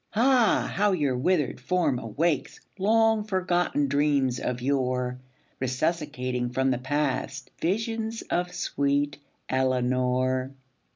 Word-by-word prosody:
Ah, 245 Hz, 0 st, +3 dB
how 205 Hz, 0 st, +3 dB
your 145 Hz, -7 st, +1 dB
withered 150 Hz, 0 st, +1 dB
form 155 Hz, -2 st, +1 dB
awakes 145 Hz, +8 st, -1 dB, 0.2 s
Long 220 Hz, +2 st, +3 dB
forgotten 180 Hz, -7 st, 0 dB
dreams 140 Hz, -2 st, +1 dB
of 125 Hz, -1 st, -2 dB
yore 125 Hz, -1 st, -1 dB, 0.4 s
Resuscitating 130 Hz, -2 st, -1 dB
from 130 Hz, +2 st, +1 dB
the 125 Hz, -, 0 dB
past 135 Hz, 0 st, -2 dB
Visions 225 Hz, +4 st, -1 dB
of 175 Hz, 0 st, -1 dB
sweet 145 Hz, -3 st, -1 dB, 0.3 s
Eleanor! 130 Hz, 0 st, 0 dB
140 Hz, 105 wpm, -26 LUFS, 130-180 Hz, 0.4 s, Ah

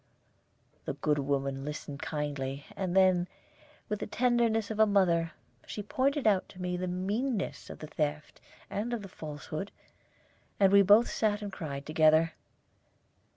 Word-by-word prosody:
The -, -, -2 dB
good 145 Hz, +1 st, 0 dB
woman 135 Hz, -1 st, -1 dB
listened 145 Hz, -1 st, -6 dB
kindly; 145 Hz, -2 st, -3 dB
and 185 Hz, -2 st, -2 dB
then, 185 Hz, -2 st, +4 dB, 0.6 s
with 210 Hz, -, -2 dB
the -, -, -4 dB
tenderness 230 Hz, -2 st, +1 dB
of 215 Hz, -, -4 dB
a 220 Hz, -, +6 dB
mother, 170 Hz, -5 st, +2 dB, 0.3 s
she 210 Hz, -, -5 dB
pointed 280 Hz, +4 st, 0 dB
out 200 Hz, -4 st, +3 dB
to 185 Hz, -, -14 dB
me 180 Hz, 0 st, -2 dB
the 180 Hz, +1 st, -2 dB
meanness 200 Hz, +6 st, -2 dB
of -, -, -8 dB
the -, -, -8 dB
theft 150 Hz, 0 st, -3 dB, 0.3 s
and 220 Hz, +4 st, -3 dB
of 225 Hz, -3 st, -3 dB
the -, -, -7 dB
falsehood, 155 Hz, +1 st, -6 dB, 0.9 s
and 195 Hz, -1 st, +5 dB
we 200 Hz, -, +8 dB
both 205 Hz, +4 st, +6 dB
sat 210 Hz, -1 st, 0 dB
and 200 Hz, -1 st, -5 dB
cried 140 Hz, -4 st, -5 dB
together. 155 Hz, +1 st, +4 dB
180 Hz, 155 wpm, -30 LUFS, 150-210 Hz, 0.9 s, we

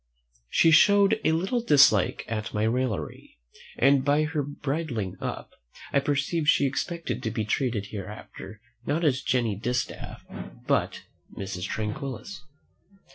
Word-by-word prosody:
She 165 Hz, -, +4 dB
showed 200 Hz, +6 st, +5 dB
a -, -, +3 dB
little 190 Hz, +9 st, 0 dB
dislike 140 Hz, -, +4 dB
at 110 Hz, -1 st, -4 dB
my 105 Hz, -, +1 dB
raillery, 110 Hz, -8 st, -2 dB, 0.4 s
and 135 Hz, 0 st, +4 dB
by 145 Hz, +2 st, +3 dB
her 155 Hz, -1 st, -1 dB
bridling 140 Hz, -, -3 dB
up, -, -, -5 dB, 0.4 s
I 140 Hz, -, +5 dB
perceived 145 Hz, +3 st, -1 dB
she 145 Hz, -, +4 dB
expected 165 Hz, +5 st, -3 dB
to 110 Hz, -, -2 dB
be 110 Hz, -1 st, -2 dB
treated 110 Hz, -1 st, -1 dB
hereafter 105 Hz, 0 st, -8 dB, 0.2 s
not 160 Hz, +4 st, -1 dB
as 130 Hz, -3 st, +2 dB
Jenny 120 Hz, -5 st, 0 dB
Distaff, 120 Hz, +4 st, -4 dB, 0.4 s
but -, -, 0 dB, 0.3 s
Mrs. 95 Hz, -1 st, -4 dB
Tranquillus. 130 Hz, -, -5 dB
135 Hz, 130 wpm, -26 LUFS, 110-155 Hz, 0.4 s, showed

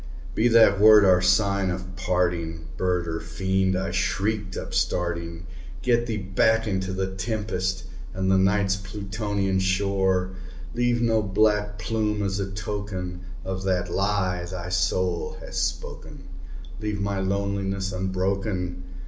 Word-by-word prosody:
"Be 115 Hz, -, +3 dB
that 115 Hz, -4 st, +6 dB
word 105 Hz, -1 st, +8 dB
our 90 Hz, -1 st, +5 dB
sign 95 Hz, +1 st, +3 dB
of 90 Hz, 0 st, -5 dB
parting, 85 Hz, -3 st, -1 dB
bird 90 Hz, -2 st, 0 dB
or 80 Hz, 0 st, -2 dB
fiend!" 95 Hz, +3 st, 0 dB
I 95 Hz, -1 st, -2 dB
shrieked, 100 Hz, +2 st, -1 dB
upstarting 85 Hz, -1 st, -2 dB, 0.4 s
"Get 120 Hz, -1 st, +2 dB
thee 110 Hz, -2 st, -1 dB
back 110 Hz, +3 st, +2 dB
into 95 Hz, -2 st, -1 dB
the 95 Hz, 0 st, -2 dB
tempest 95 Hz, -3 st, -2 dB, 0.3 s
and 95 Hz, +1 st, 0 dB
the 95 Hz, -, +5 dB
Night's 95 Hz, 0 st, +2 dB
Plutonian 100 Hz, 0 st, -2 dB
shore! 95 Hz, -1 st, +1 dB, 0.4 s
Leave 120 Hz, 0 st, +1 dB
no 115 Hz, -1 st, +3 dB
black 105 Hz, +1 st, +1 dB
plume 105 Hz, +2 st, -1 dB
as 100 Hz, 0 st, -1 dB
a 100 Hz, -1 st, -2 dB
token 95 Hz, -3 st, -4 dB, 0.2 s
of 95 Hz, 0 st, -3 dB
that 90 Hz, -2 st, 0 dB
lie 95 Hz, -3 st, 0 dB
thy 90 Hz, 0 st, -6 dB
soul 90 Hz, -1 st, 0 dB
hath -, -, -10 dB
spoken! -, -, -4 dB, 0.6 s
Leave 105 Hz, -1 st, -2 dB
my 100 Hz, -1 st, -1 dB
loneliness 100 Hz, 0 st, -1 dB
unbroken! 95 Hz, -1 st, -2 dB
95 Hz, 130 wpm, -25 LUFS, 90-105 Hz, 0.6 s, word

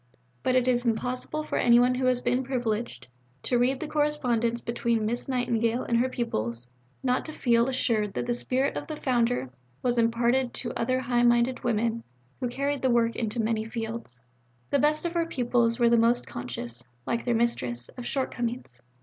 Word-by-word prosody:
But 255 Hz, -, +1 dB
it 255 Hz, -1 st, +3 dB
is 245 Hz, -1 st, +2 dB
impossible 250 Hz, +6 st, -1 dB
for -, -, -2 dB
anyone 245 Hz, +1 st, +5 dB
who 255 Hz, +1 st, -1 dB
has 250 Hz, -1 st, +2 dB
been 250 Hz, +1 st, +1 dB
privileged 240 Hz, -3 st, -2 dB, 0.4 s
to 245 Hz, -, +1 dB
read 255 Hz, +2 st, +2 dB
the 315 Hz, -, -4 dB
correspondence 250 Hz, -7 st, +1 dB
between 235 Hz, -2 st, -1 dB
Miss 240 Hz, +3 st, -2 dB
Nightingale 235 Hz, -2 st, +1 dB
and 235 Hz, -, 0 dB
her 255 Hz, +2 st, +2 dB
pupils 120 Hz, -, -2 dB, 0.4 s
not 250 Hz, -1 st, +1 dB
to 310 Hz, -, -6 dB
feel 235 Hz, -4 st, +2 dB
assured 225 Hz, -6 st, 0 dB
that -, -, -1 dB
the 240 Hz, -, 0 dB
spirit 260 Hz, +3 st, 0 dB
of -, -, -4 dB
the 310 Hz, -, -4 dB
Founder 240 Hz, -, 0 dB, 0.3 s
was 245 Hz, -1 st, +2 dB
imparted 235 Hz, +2 st, +2 dB
to 240 Hz, -1 st, -4 dB
other 255 Hz, +1 st, 0 dB
high 240 Hz, -1 st, +1 dB
minded 240 Hz, +1 st, +3 dB
women 230 Hz, 0 st, 0 dB, 0.4 s
who 250 Hz, -, -1 dB
carried 280 Hz, +3 st, -1 dB
the 260 Hz, -, +2 dB
work 235 Hz, -1 st, +2 dB
into 225 Hz, 0 st, -2 dB
many 220 Hz, 0 st, +1 dB
fields. 225 Hz, -, -5 dB, 0.5 s
The 280 Hz, -, +3 dB
best 300 Hz, +3 st, +2 dB
of 340 Hz, -, -1 dB
her 335 Hz, -1 st, +1 dB
pupils 240 Hz, -4 st, +1 dB
were 240 Hz, -2 st, +4 dB
the 235 Hz, -, +5 dB
most 235 Hz, +2 st, +3 dB
conscious, 120 Hz, -1 st, -6 dB, 0.2 s
like 235 Hz, -, -1 dB
their 240 Hz, -2 st, +1 dB
Mistress, 125 Hz, -, 0 dB
of 245 Hz, -, -7 dB
shortcomings. 245 Hz, -, -3 dB
240 Hz, 185 wpm, -27 LUFS, 230-255 Hz, 0.5 s, anyone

